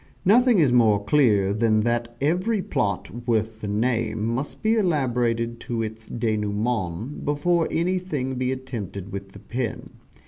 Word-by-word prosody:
Nothing 240 +4 +5
is 150 -8 +4
more 110 -4 +4
clear 105 -7 +3
than 110 0 +2
that 120 +1 -1
every 180 +10 +1
plot, 110 - -2
worth 110 -1 0
the 105 - -4
name, 110 0 0
must 120 +5 -3
be 220 +1 +3
elaborated 120 - 0
to 115 -2 0
its 110 0 -6
denouement 110 - -2
before 165 +4 +1
anything 170 -6 -1
be 130 0 -1
attempted 110 -7 -6
with 100 0 -7
the 100 - -11
pen. 115 +2 -4
120 Hz, 140 wpm, -24 LUFS, 110-145 Hz, -, Nothing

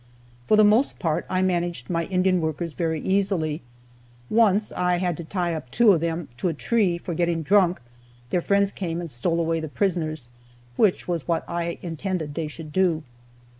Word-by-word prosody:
For 215 - +5
the 215 - +7
most 215 +6 +4
part 160 -4 -1
I 185 0 +1
managed 175 -8 -1
my 170 -1 -1
Indian 185 0 +2
workers 160 +1 -3
very 160 -1 -1
easily. 190 -6 0 0.7
Once 215 -2 +3
I 180 0 +1
had 175 -1 0
to 170 - -6
tie 175 0 -2
up 150 -6 -6
two 230 - +5
of 170 -5 +2
them 165 -1 -2
to 185 - -1
a 165 - -1
tree 195 -1 +1
for 170 0 -5
getting 170 0 0
drunk; 185 +1 +3 0.5
their 180 - +2
friends 200 +2 +2
came 170 -4 -3
and 170 -3 -5
stole 165 +8 0
away 165 0 0
the 160 - -4
prisoners 155 -7 -1 0.5
which 200 - +2
was 170 -4 -2
what 170 -1 -1
I 170 0 -3
intended 165 -2 -3
they 160 0 -3
should 155 0 -9
do. 175 -4 +2
175 Hz, 185 wpm, -24 LUFS, 160-190 Hz, 0.7 s, the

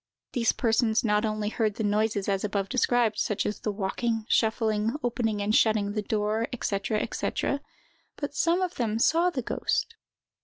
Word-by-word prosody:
These 230 -2 +2
persons 225 -1 +2
not 210 -1 +2
only 215 -1 -1
heard 215 -2 0
the 225 - -3
noises 210 -1 +1
as 195 -1 0
above 200 -2 -1
described, 245 -4 +2
such 210 - 0
as 210 - -2
the 210 - -2
walking, 220 +3 -2
shuffling, 220 0 +1
opening 225 -4 0
and 210 +1 0
shutting 215 -2 +3
the 210 0 -1
door, 215 +2 -1
&c., 200 - -1 0.3
&c., 280 - -1 0.6
but 285 -1 -5
some 340 +5 +2
of 365 -1 -3
them 225 -3 0
saw 330 +9 +3
the 265 -8 -3
ghost. - - -1
220 Hz, 165 wpm, -27 LUFS, 210-235 Hz, 0.6 s, shutting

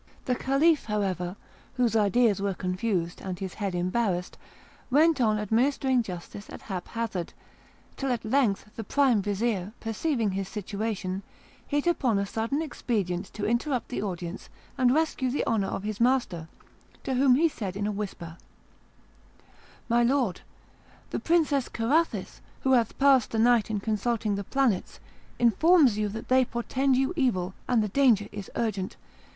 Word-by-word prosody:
The 250 - +1
Caliph, 275 +5 +2
however, 190 -4 -2 0.4
whose 245 -3 +1
ideas 215 -1 +3
were 200 -1 -1
confused 180 -1 -2
and 185 -2 -5
his 190 -1 -5
head 200 -4 -3
embarrassed, 180 0 -1 0.5
went 300 +1 +4
on 215 -2 +3
administering 250 +4 +2
justice 195 0 -8
at - - -10
haphazard, 195 -1 -4 0.6
till 270 -1 -1
at 240 -2 -2
length 220 -4 +1
the 225 - -5
prime 255 -1 +3
vizir, 205 -1 -1
perceiving 225 -1 -1
his 195 0 -3
situation, 200 -2 -3 0.5
hit 290 0 0
upon 265 -11 +2
a 200 - 0
sudden 230 +9 -2
expedient 200 - -2
to 210 - -4
interrupt 245 +3 0
the 250 - -3
audience 180 -2 -5 0.3
and 255 -1 +3
rescue 295 -3 +1
the 265 - -1
honour 215 -4 +1
of 195 - -4
his 210 -1 -4
master, 235 -10 +1 0.6
to 265 - -2
whom 255 0 +5
he 325 +5 +4
said 200 - -5
in 205 - -2
a 210 - 0
whisper: 190 -5 -6 1.5
"My 235 0 +3
Lord, 240 -5 +1 0.7
the - - -1
Princess 305 -6 +2
Carathis, 290 +9 0 0.2
who 265 - +1
hath 235 -4 +2
passed 270 -3 +4
the 225 - -3
night 235 -1 +4
in 215 -2 -1
consulting 215 +1 -1
the 200 0 -2
planets, 250 -4 0 0.4
informs 250 - +4
you 210 -1 0
that 225 +2 -7
they 260 0 +5
portend 255 +2 0
you 270 +6 +1
evil, 195 - 0
and 240 -3 +3
the - - -1
danger 230 -4 +3
is 205 -1 -7
urgent. 200 -5 -2
225 Hz, 155 wpm, -27 LUFS, 200-260 Hz, 1.5 s, whom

